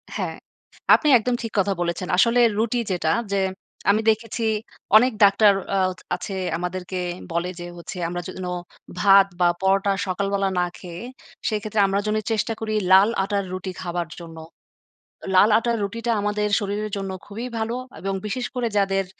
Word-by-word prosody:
হ্যাঁ, - - -3 0.6
আপনি 305 - -1
একদম 240 +2 -1
ঠিক 230 -2 -5
কথা 195 +1 +2
বলেছেন। 175 +1 -2
আসলে 235 +5 +4 0.2
রুটি 235 +2 +1
যেটা, 165 -3 0 0.2
যে 200 - +1 0.5
আমি 215 +2 +4
দেখেছি 225 +1 -1 0.5
অনেক 250 +3 +4
ডাক্তার 200 +1 +6 0.2
আ - - +2 0.4
আছে, 195 - -6 0.2
আমাদেরকে 180 +1 -4 0.3
বলে 170 +2 -1
যে 175 - -6
হচ্ছে 170 +2 -8
আমরা 175 +1 -4
যেন 185 0 -6 0.5
ভাত 195 0 +7
বা 175 - +5
পরোটা 195 +1 +2 0.2
সকালবেলা 195 +1 0
না 180 - +2
খেয়ে, 175 +3 -8 0.5
সেক্ষেত্রে 215 0 -2
আমরা 195 +1 0
যেন 210 - +1 0.2
চেষ্টা 225 +1 0
করি 220 -1 -3 0.2
লাল 195 +3 +7
আটার 200 0 -1
রুটি 185 0 -4
খাবার 175 -2 -3
জন্য। 165 -1 -10 1.0
লাল 205 +4 +6
আটার 235 0 0
রুটিটা 230 +4 -3
আমাদের 210 0 0
শরীরের 205 +1 -3
জন্য 195 -1 -4 0.2
খুবই 225 +5 -6
ভালো, 225 +2 -2 0.3
এবং 195 0 -2
বিশেষ 245 +4 -2
করে 245 -2 -1
যাদের 195 -1 +1
200 Hz, 155 wpm, -23 LUFS, 185-220 Hz, 1.0 s, ভাত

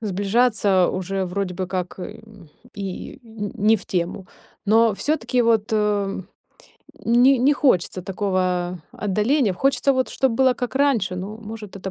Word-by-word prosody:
сближаться 205 -1 +2
уже 190 +1 -2
вроде 180 0 -3
бы 185 +1 -3
как, 185 0 -4
э, 215 +4 -8 0.5
и 195 +4 -6
не 220 -3 -6
не 220 +1 +5
в 200 - -13
тему, 180 +1 -2 0.4
но 220 +1 +4
всё-таки 255 -1 0
вот, 225 -2 +2
э, 205 -2 0 0.8
не 245 +3 +5
не 270 +5 +4
хочется 185 - +1
такого 185 -2 -1
отдаления. 210 +3 +1
Хочется 275 +4 +2
вот, 260 -1 0
чтоб 265 -2 0
было 260 +2 +3
как 250 +1 -4
раньше. 235 -10 +1
Ну, 200 +4 -6
может, 215 -2 -9
это 190 0 -6
210 Hz, 145 wpm, -22 LUFS, 185-235 Hz, 0.8 s, не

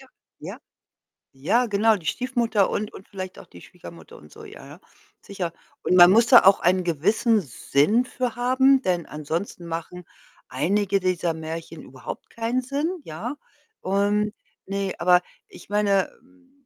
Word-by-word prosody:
Ja. - - -16 0.3
Ja. - - -8 0.8
Ja 235 - +2
genau, 215 +1 +2
die 165 -5 -12
Stiefmutter 235 -5 0
und 210 0 -3
und 190 - -13
vielleicht 185 -2 -7
auch - - -12
die 85 - -15
Schwiegermutter - - -13
und 75 0 -17
so, - - -12
ja, - - -12
ja. - - -13 0.4
Sicher, 180 -4 -5 0.3
und - - +1
man 175 0 +9
muss 230 +3 +4
da 245 - +8
auch 195 - +6
einen 185 +1 +2
gewissen 210 - +1
Sinn 150 - +1
für 250 -3 -3
haben, 260 +2 +3
denn 175 -5 -1
ansonsten 165 +4 -5
machen 170 +2 -6 0.4
einige 195 +9 0
dieser 180 -2 -1
Märchen 160 0 -7
überhaupt 130 0 -9
keinen 230 +2 -2
Sinn, 295 +7 -3
ja? 215 - -6 0.4
Und 205 +2 0 0.3
ne, 195 -1 -3
aber 180 +1 +4 0.3
ich - - -15
meine, 200 -2 +1
hm 265 +1 -27
200 Hz, 155 wpm, -24 LUFS, 170-235 Hz, 0.8 s, man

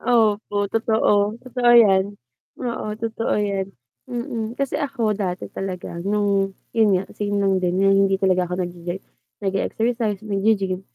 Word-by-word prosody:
Opo. 215 -3 +2
Totoo, 220 -2 +2
totoo 250 -1 +1
yan, 200 -3 +5 0.4
oo 240 -4 -4
totoo 225 0 -2
yan, 200 -2 -1 0.4
mm, 235 -1 -4
kasi 275 -2 -1
ako 255 -7 0
dati 190 -3 -3
talaga 185 -3 -5
nung 200 0 +1 0.2
yun 215 -4 +4
nga 185 - -2
same 205 -1 -2
lang 195 -2 +2
din 180 0 0
na 195 +1 +4
hindi 195 0 +4
talaga 185 -2 +1
ako 180 +1 -2
nag-e 175 +1 -6 0.4
nag-exercise, 215 +2 -1
nag-g-gym, 200 -2 0
205 Hz, 135 wpm, -22 LUFS, 195-225 Hz, 0.4 s, yan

